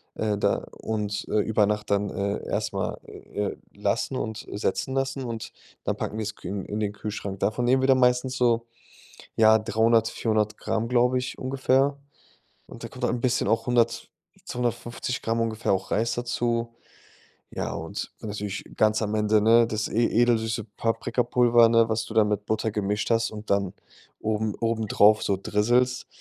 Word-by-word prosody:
äh, 105 -2 -1
da - - 0 0.2
und, 105 -2 -2
äh, 105 - +2
über 105 0 +2
Nacht 105 0 -2
dann, 100 0 +1
äh, 100 +1 -3
erst - - -1
mal, - - -2
äh, 105 -1 -5
äh, - - -17 0.2
lassen - - -1
und 110 0 -4
setzen 105 +5 -2
lassen 135 0 -1
und 115 -2 -6 0.3
dann - - 0
packen 110 - -4
wir's 105 -1 -3
kü - - -8
in 100 -1 -4
in 105 - -4
den 105 -1 0
Kühlschrank. 100 -2 -5
Davon 110 +5 0
nehmen 130 +2 +3
wir - - +3
dann 130 -1 +5
meistens 125 +1 +2
so, 120 -2 +2 0.7
ja, 110 0 +6
300, 115 +1 +2
400 110 -2 -1
Gramm, 110 +1 -2
glaube 125 +1 +3
ich, 125 0 -4
ungefähr. 135 +1 +1 0.7
Und - - -11
da - - -4
kommt - - -6
halt - - +1
'n 120 - -3
bisschen 125 -1 +1
auch 115 - +1
100, 120 -1 +1 0.3
250 120 0 -3
Gramm 115 +1 0
ungefähr 110 -2 0
auch 95 - -1
Reis 115 +3 +1
dazu. 120 -1 -1 0.8
Ja, - - -3
und - - -5
dann 110 - -5
natürlich 105 -1 -4
ganz 110 0 +3
am 105 -1 -1
Ende, 105 0 +3
ne, 115 +2 +5
das 110 -1 -2
e 115 +2 +2
edelsüße 115 -1 +1
Paprikapulver, 120 +1 +3
ne, 115 0 +4
was 110 0 -1
du - - -8
dann 110 -2 +4
mit 105 0 -1
Butter 110 0 -1
gemischt 105 0 -1
hast 115 0 +2
und 110 0 -9
dann 100 -2 +1 0.5
oben 110 -1 -1
obendrauf 110 -2 +3
so 100 - 0
drisselst, 120 +5 +1
110 Hz, 180 wpm, -26 LUFS, 105-120 Hz, 0.8 s, ja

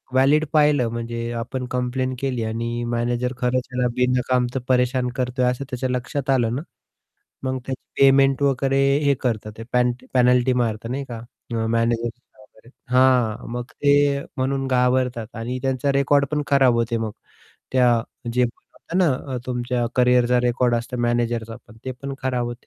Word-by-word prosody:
Valid 145 +4 +4
पाहिलं 150 -6 +4
म्हणजे 115 0 -4
आपण 125 +2 -4
कंप्लेंट 130 +1 -1
केली 125 -4 -1
आणि 115 +2 -3
मॅनेजर 120 +1 -1
खरंच 125 +1 +1
त्याला 125 -1 0
बिनकामच 125 0 +1
परेशान 125 0 +2
करतोय 125 0 0
असं 125 +2 0
त्याच्या 130 -1 -2
लक्षात 125 +2 -3
आलं 120 -3 +2
ना, 140 - -2 0.8
मग 130 0 -1
त्याची 130 -1 -7
पेमेंट 135 0 +5
वगैरे 135 0 +2 0.3
हे 140 -1 +4
करतात 110 -4 -2
ते - - -6
पेन 125 0 +3 0.2
पेनल्टी 125 0 +4
मारतात 115 0 -3
नाही 140 +2 -3
का 115 -1 -5 0.5
मॅनेजर 115 0 +1 0.3
वगैरे, 110 +3 -20 0.2
हां, 125 -4 +3
मग 120 0 -3
ते 145 -1 +3 0.2
म्हणून 135 +1 -1
घाबरतात 125 -2 0
आणि 120 +3 -3
त्यांचा 135 +1 0
रेकॉर्ड 140 +1 +3
पण 150 -1 +1
खराब 135 -4 +4
होते 115 0 0
मग. 110 -2 -3 0.6
त्या 120 -3 +4 0.3
जे 125 +1 +2
होतं 125 +8 -6
ना, 135 -6 0
तुमच्या 120 -1 -1
करियरचा 125 0 +4
रेकॉर्ड 120 0 +1
असतो 120 +1 -4
मॅनेजरचा 120 -1 -1
पण 110 - -15
ते 130 - -3
पण 135 +2 -7
खराब 125 -2 0
होते. 120 0 -8
125 Hz, 155 wpm, -22 LUFS, 120-130 Hz, 0.8 s, पेमेंट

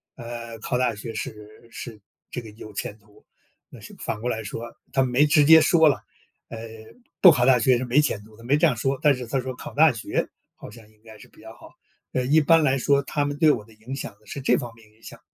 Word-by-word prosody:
呃， 115 -1 -8
考 125 - -2
大 125 -2 +1
学 110 +2 -8
是 110 -1 -8
是 115 -4 -9 0.3
这 125 - -5
个 110 -2 -12
有 110 0 -12
前 100 +1 -5
途。 105 0 -24 0.4
那 - - -14
是 - - -12
反 105 - -4
过 125 - -2
来 110 -2 -3
说 115 +3 -7 0.2
他 135 -1 +3
没 130 +3 +3
直 150 0 +4
接 160 +2 +9
说 160 0 +4
啦， 140 - -2 0.5
呃， 115 - -7 0.6
不 180 - +10
考 120 - +2
大 125 -1 +5
学 125 +1 +3
是 130 - -3
没 125 +4 +2
前 110 -8 -2
途 110 +1 -18
的， 115 - -15
没 135 +4 +2
这 160 - +3
样 125 -6 -1
说， 135 +5 -1
但 150 -3 +5
是 125 - -7
他 135 +2 -1
说 130 0 -5
考 - - -10
大 155 +1 +5
学 115 -4 -3 0.3
好 - - -11
像 110 -1 -15
应 105 -1 -30
该 110 -1 -14
是 - - -15
比 - - -21
较 110 +1 -12
好， 120 - -16 0.4
呃， 130 - 0
一 150 +5 +4
般 160 +2 +4
来 135 -2 +2
说 140 +2 +2
他 145 +1 -2
们 145 0 -4
对 155 0 +5
我 110 -7 -3
的 115 - -19
影 110 +5 -10
响 135 - -6
呢 100 - -31
是 140 - -7
这 130 - +3
方 120 -2 -6
面 110 -2 -20
影 110 - -29
响。 - - -11
125 Hz, 280 characters per minute, -24 LUFS, 110-140 Hz, 0.6 s, 不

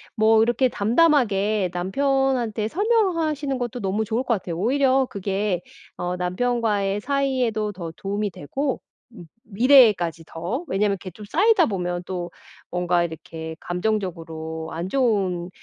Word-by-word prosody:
뭐 220 0 +5
이렇게 240 +3 +2
담담하게 215 - +2
남편한테 240 +3 0
설명하시는 330 - +1
것도 245 0 -3
너무 205 +1 -1
좋을 225 +4 -1
것 245 - +1
같아요. 170 -3 -5
오히려 265 +5 +2
그게 195 -1 -1 0.4
어 180 0 -2
남편과의 205 +1 0
사이에도 255 -6 0
더 170 -3 -6
도움이 200 +2 -2
되고 265 - -3 0.3
음 220 -7 -12 0.2
미래에까지 215 - +4
더 175 - -4
왜냐하면 200 +1 +1
이렇게 185 -1 -9
좀 210 +5 -11
쌓이다 390 0 +4
보면 180 -3 -2
또 175 -2 -4 0.4
뭔가 180 0 +1
이렇게 160 -1 -6
감정적으로 165 -5 -3
안 170 +3 -4
좋은 195 -8 0
210 Hz, 310 characters per minute, -23 LUFS, 180-255 Hz, 0.4 s, 뭐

